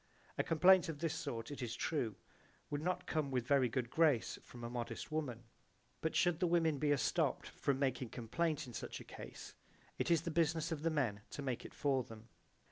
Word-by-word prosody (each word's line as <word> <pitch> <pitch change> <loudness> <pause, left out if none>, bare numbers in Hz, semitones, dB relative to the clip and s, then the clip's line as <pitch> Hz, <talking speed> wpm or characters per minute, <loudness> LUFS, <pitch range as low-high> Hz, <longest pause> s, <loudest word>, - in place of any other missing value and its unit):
A - - +1
complaint 180 +2 +6
of 160 - -3
this 160 +1 -1
sort, 130 -6 -4
it 140 - -6
is 120 -1 -3
true, 120 -9 -1 0.6
would 145 0 -1
not 180 +2 -1
come 155 -5 0
with 125 -2 0
a - - -20
very 135 -3 +4
good 120 0 -2
grace 155 -8 +3
from 120 -1 -11
a - - -2
modest 120 +4 -4
woman; 135 -7 -2 0.6
but 160 - -1
should 175 -2 +3
the 180 - +3
women 165 -4 +3
be 150 - +2
estopped 145 -3 +2
from 140 -2 -1
making 130 -3 0
complaint 150 +8 -1
in 125 - -10
such - - -5
a - - -8
case - - -9 0.5
it - - 0
is 165 -2 +4
the 170 - -2
business 160 0 +1
of 155 -3 -2
the 165 - +2
men 125 -10 0
to 145 - -5
make 130 -3 -2
it - - -9
for 135 -3 +2
them. 115 0 -12
145 Hz, 210 wpm, -37 LUFS, 125-160 Hz, 0.6 s, complaint